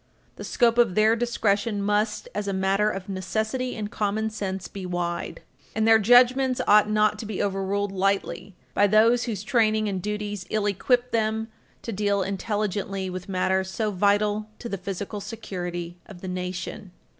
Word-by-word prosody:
The - - -7
scope 235 0 +2
of 215 -7 +4
their 215 +1 +4
discretion 220 -3 0
must, 210 +1 0
as 205 -1 -3
a 200 - -1
matter 195 +2 +2
of 195 -2 -5
necessity 220 +6 -2
and 210 -1 -5
common 215 +1 -1
sense, 190 -3 -4
be 195 - -8
wide. 175 -1 -3 0.3
And 220 0 +2
their 225 0 +7
judgments 250 +3 +5
ought 210 0 +5
not 215 0 +2
to 220 - -5
be 210 -3 -4
overruled 200 0 -1
lightly 195 0 -1 0.2
by 205 - +4
those 225 +4 +4
whose 210 -5 -4
training 220 -2 +2
and 190 -2 -2
duties 205 -1 -4
ill 215 -1 0
equip 245 +5 +1
them 220 0 0 0.3
to 230 - -4
deal 200 -1 +1
intelligently 195 -1 -2
with 185 +2 -7
matters 190 0 0
so 215 +2 -1
vital 205 +2 +1
to 235 - -7
the 200 - -3
physical 200 +2 -5
security 175 -5 -6
of 185 -4 -12
the 185 - -6
nation. 180 +1 -5
205 Hz, 165 wpm, -25 LUFS, 190-220 Hz, 0.3 s, their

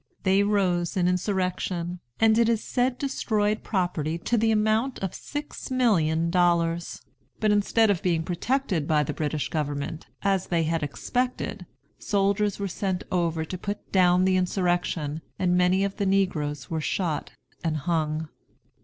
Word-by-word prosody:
They 195 +1 +4
rose 190 -3 +1
in 180 -1 +3
insurrection, 180 -2 -1 0.2
and 220 -1 +5
it 230 -1 +4
is 225 -2 +1
said 250 0 0
destroyed 215 -6 0
property 175 -5 -1
to 205 +8 -1
the 225 0 +2
amount 220 +4 +2
of 190 -2 -3
six 290 0 -6
millions 175 -11 +2
of 170 - -1
dollars. 170 -1 +1 0.4
But 215 -1 +2
instead 210 +1 +3
of 185 - -1
being 170 -3 +1
protected 180 - -1
by 150 -1 +3
the - - -3
British 150 -1 -2
government, 145 0 -3 0.2
as 195 -2 +1
they 170 -2 +1
had 165 +1 0
expected, 245 - -2 0.3
soldiers 200 0 +1
were 200 - -2
sent 190 0 -2
over 165 -3 0
to 185 - -5
put 205 +2 -5
down 180 -1 +4
the 190 0 +3
insurrection, 175 -4 0 0.2
and 180 -1 +2
many 180 +2 +3
of 200 0 -2
the 200 -2 0
negroes 150 -9 0
were 160 -1 -2
shot 165 -1 -2 0.3
and 160 -2 0
hung. 155 0 -1
180 Hz, 155 wpm, -26 LUFS, 165-205 Hz, 0.4 s, and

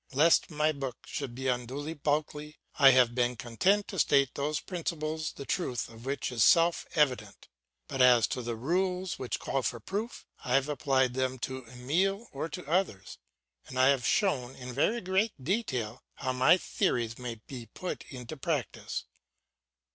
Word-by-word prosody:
Lest 155 +5 +4
my 155 -1 +1
book 135 -4 -6
should 135 -5 -5
be 130 +1 -3
unduly 130 +5 -2
bulky, 150 0 -2 0.2
I 140 -2 +9
have 125 -2 +5
been 125 0 +1
content 185 - +1
to 195 - -4
state 140 -3 +3
those 145 +1 -1
principles 160 -3 -3
the 140 - -8
truth 130 -9 -2
of 115 +2 -12
which 140 -1 -2
is 115 -3 +2
self 170 +5 +4
evident. 125 -9 0 0.4
But 135 - -2
as 125 -3 +7
to 125 - -2
the 120 -1 -3
rules 180 +8 -1
which 125 - -2
call 135 - -1
for 120 -1 -2
proof, 205 - -5 0.2
I 125 - +1
have 135 +1 +3
applied 130 -3 +1
them 130 0 -1
to 130 -2 -7
Emile 175 - -1
or 150 +3 -4
to 180 +3 -7
others, 155 - -1 0.5
and 130 - -7
I 130 +1 +6
have 135 -3 +2
shown, 135 - +1
in 125 -1 -8
very 220 - +1
great 190 +4 +1
detail, 130 - -2
how 130 -1 -2
my 130 +7 +5
theories 120 -9 -1
may 120 -2 -4
be 115 +1 -10
put 180 - -6
into 125 +2 -7
practice. 145 -3 -3
135 Hz, 170 wpm, -30 LUFS, 125-160 Hz, 0.5 s, I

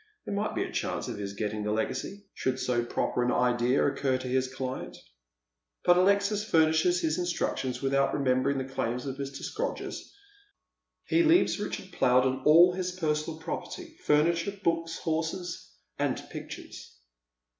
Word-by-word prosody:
There - - -4
might 205 +1 -1
be - - +1
a - - -6
chance - - -2
of - - -5
his 100 -1 -4
getting 105 +1 -3
the 105 0 -1
legacy, 130 - -3
should 130 0 -1
so 120 -2 0
proper 120 +1 -1
an 125 0 +2
idea 125 +1 +2
occur 135 -2 +1
to 130 - -6
hia 130 +1 +2
client. 130 0 -5 0.9
But 175 - +6
Alexis 200 +3 +3
furnishes 160 -1 +3
his 160 +1 0
instructions 155 -7 -2
without 135 0 +2
remember 130 -1 +2
ing 140 - 0
the 130 - -2
claims 125 0 -2
of 135 -1 -4
Mr. 140 -1 -6
Scrodgers. - - -4 0.9
He 335 - +3
leaves 335 - +4
Richard 205 -2 -5
Plowden 130 -2 +2
all 170 +4 +7
bis 180 0 -3
personal 155 0 -1
property, 325 - -6
furniture, 170 +6 +2
books, 165 0 0
horses, 165 +2 -3 0.3
and - - +1
pictures. - - -9
150 Hz, 155 wpm, -29 LUFS, 130-180 Hz, 0.9 s, all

